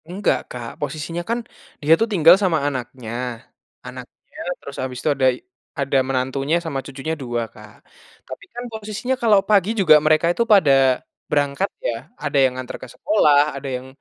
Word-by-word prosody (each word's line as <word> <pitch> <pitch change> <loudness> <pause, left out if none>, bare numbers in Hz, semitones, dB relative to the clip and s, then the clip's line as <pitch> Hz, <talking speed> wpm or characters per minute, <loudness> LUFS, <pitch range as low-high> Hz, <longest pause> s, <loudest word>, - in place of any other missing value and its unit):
Enggak 195 +4 0
Kak, 120 -2 -7
posisinya 155 +4 -4
kan 235 +1 0 0.4
dia 155 +2 +5
tuh 225 - +2
tinggal 170 -4 +7
sama 175 -4 +2
anaknya, 125 -4 -5 0.8
anaknya - - -12 0.2
terus 140 - -10
habis 130 -1 -4
itu - - 0
ada 135 -1 +1 0.6
ada 140 0 +1
menantunya, 135 +3 -1
sama 140 -4 -2
cucunya 140 +3 -5
2 120 -2 -2
Kak, - - -14 0.5
tapi 130 +7 -9
kan 245 +1 -6
posisinya 220 +4 -3
kalau 215 -4 +5
pagi 200 -2 +4
juga 160 -6 +7
mereka 155 +2 +4
itu 235 - +1
pada 185 -9 +5 0.6
berangkat 145 +6 0 0.2
ya, - - 0 0.3
ada 145 -1 -1
yang 130 -1 +2
nganter 130 -1 -6
ke - - -8
sekolah, 150 -8 +3
ada 140 0 -5
yang 130 +1 -11
145 Hz, 165 wpm, -21 LUFS, 130-185 Hz, 0.8 s, tinggal